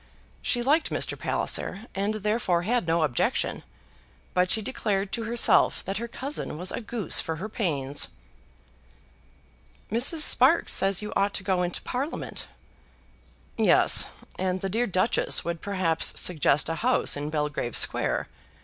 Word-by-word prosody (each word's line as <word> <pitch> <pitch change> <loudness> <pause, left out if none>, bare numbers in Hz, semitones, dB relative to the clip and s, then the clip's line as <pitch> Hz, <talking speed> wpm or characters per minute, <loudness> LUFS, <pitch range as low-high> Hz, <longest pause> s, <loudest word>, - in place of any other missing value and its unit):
She 240 -1 +1
liked 300 +5 +2
Mr. - - -1
Palliser, 195 +5 -2
and 200 +2 -1
therefore 210 -4 0
had 235 -1 0
no 165 0 +2
objection; 130 -7 -1 0.7
but 180 0 +2
she 220 - +4
declared 200 -4 -2
to 230 -1 -3
herself 235 +1 +2
that 195 0 -3
her 235 +2 -4
cousin 265 - -4
was 180 +3 0
a - - -4
goose 220 -4 0
for 160 - -3
her 185 +7 -5
pains. 145 - -2 1.8
"Mrs. 255 +8 +2
Sparkes - - +4
says 195 +1 +2
you 210 - -5
ought 200 0 +1
to 190 - -1
go 185 -1 0
into 175 -1 -2
Parliament." 270 +5 -4 1.1
"Yes; - - +5 0.3
and 185 0 -1
the 195 - -2
dear 235 +5 0
Duchess 185 +3 +1
would 170 -1 -3
perhaps 185 -5 +2
suggest 150 -4 +2
a 165 - -2
house 250 +2 +2
in 145 +1 -4
Belgrave 150 -6 -2
Square. - - +1
195 Hz, 145 wpm, -26 LUFS, 170-230 Hz, 1.8 s, Yes